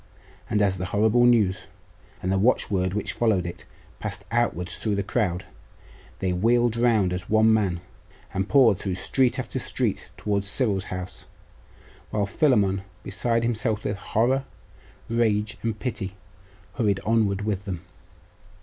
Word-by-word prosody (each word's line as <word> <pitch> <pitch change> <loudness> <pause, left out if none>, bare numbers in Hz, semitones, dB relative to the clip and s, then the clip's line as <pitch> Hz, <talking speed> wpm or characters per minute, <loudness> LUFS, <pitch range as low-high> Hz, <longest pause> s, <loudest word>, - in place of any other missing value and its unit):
And 105 -1 +2
as 95 -2 +1
the 90 - -2
horrible 110 +6 +3
news, 100 -6 +2 0.6
and 95 - 0
the 95 - +2
watchword 95 -4 +1
which 105 - -2
followed 110 -7 +1
it, 85 - -7 0.3
passed 100 -1 -4
outwards 105 -7 0
through 105 -2 0
the 100 - -1
crowd, 95 -4 -1 0.7
they 95 -1 -1
wheeled 120 +5 +2
round 115 -6 +2
as 90 +1 -5
one 110 +1 +5
man, 95 -6 +1 0.5
and 95 +1 -1
poured 120 -9 +5
through 95 -3 -2
street 125 +6 +1
after - - -3
street - - -2
towards 100 -1 -1
Cyril's 105 -5 +1
house; 90 0 -7 0.8
while 105 -2 0
Philammon, 100 -5 +2 0.2
beside 115 +4 0
himself 110 -2 0
with 100 - -2
horror, 125 +6 +1 0.6
rage, 110 -2 0
and 115 -2 -2
pity, 100 -6 -4 0.6
hurried 105 -5 +2
onward 105 -3 +1
with 100 -2 -2
them. 90 -5 -4
105 Hz, 140 wpm, -25 LUFS, 95-115 Hz, 0.8 s, one